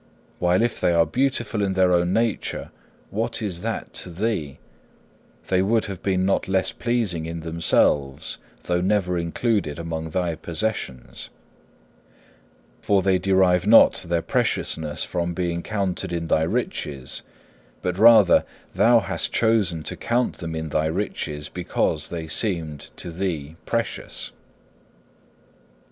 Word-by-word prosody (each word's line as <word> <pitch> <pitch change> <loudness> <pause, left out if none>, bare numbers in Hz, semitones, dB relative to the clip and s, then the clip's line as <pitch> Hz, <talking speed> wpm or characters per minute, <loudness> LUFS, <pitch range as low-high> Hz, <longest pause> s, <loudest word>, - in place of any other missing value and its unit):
While 90 +4 +3
if 120 -1 -1
they 85 - +3
are 85 -1 +4
beautiful 120 - 0
in 100 -1 +1
their 95 -1 +3
own 85 0 +2
nature, 115 +1 -1 0.4
what 110 +3 -1
is 95 -6 -3
that - - -4
to - - -6
thee? 85 -6 -2 0.9
They 95 -1 +3
would 110 +3 +2
have 100 -4 -6
been 95 -1 +1
not 95 - +1
less 95 0 +1
pleasing 110 -10 -1
in 85 0 -5
themselves, 80 -4 +1 0.2
though 90 0 0
never 90 -2 +1
included 85 -2 -1
among 80 -1 -4
thy 90 0 -1
possessions. 80 - -3 1.5
For 100 -2 +2
they 95 -1 +3
derive 95 -1 +3
not 115 +1 +7
their 85 -1 +1
preciousness 75 -2 -1
from 85 0 -2
being 85 -1 -1
counted 95 -2 -2
in 85 -1 -2
thy 80 0 +2
riches, 70 -3 -3 0.6
but 90 0 -2
rather 110 -4 +7 0.3
thou - - +5
hast - - -2
chosen 105 -8 +2
to - - -4
count 120 +1 0
them 80 -2 -4
in 80 0 -4
thy 80 +1 +1
riches 80 -4 -3
because 90 +2 -1
they 85 -2 -4
seemed 80 -4 -2
to 85 - -5
thee 80 -4 -3
precious. 115 0 -2
90 Hz, 135 wpm, -23 LUFS, 80-100 Hz, 1.5 s, not